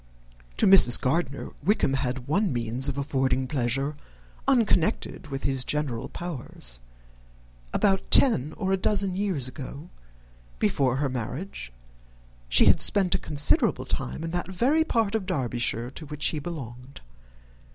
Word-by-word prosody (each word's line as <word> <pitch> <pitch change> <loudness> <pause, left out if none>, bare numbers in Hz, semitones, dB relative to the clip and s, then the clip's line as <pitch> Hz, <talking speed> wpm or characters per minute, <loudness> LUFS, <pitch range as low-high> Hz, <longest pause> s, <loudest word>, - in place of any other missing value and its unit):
To - - +3
Mrs. 190 -11 +8
Gardiner, 140 +1 -2
Wickham 185 -6 +1
had 130 -1 -3
one 195 +6 +1
means 120 +2 -1
of 140 - -4
affording 135 -2 0
pleasure, 135 +2 -1 0.5
unconnected 220 - +1
with 135 -1 -6
his 135 -2 +2
general 135 -4 -2
powers. 125 - -6 0.9
About 195 -2 +1
ten 155 - +5
or 190 -2 -2
a - - +2
dozen 195 -1 +1
years 185 -10 -1
ago, 140 +4 -9 0.7
before 130 - +1
her 140 +1 0
marriage, 130 - -6 0.8
she - - +5
had - - +5
spent 190 -3 +3
a - - +1
considerable 145 -1 +1
time 160 - -4
in 165 - -4
that 175 0 -3
very 270 - +2
part 225 -9 0
of 215 -4 -2
Derbyshire 120 - -1
to 155 +2 -10
which 150 0 -3
he 155 - -3
belonged. 135 -5 -8
145 Hz, 140 wpm, -26 LUFS, 130-185 Hz, 0.9 s, Mrs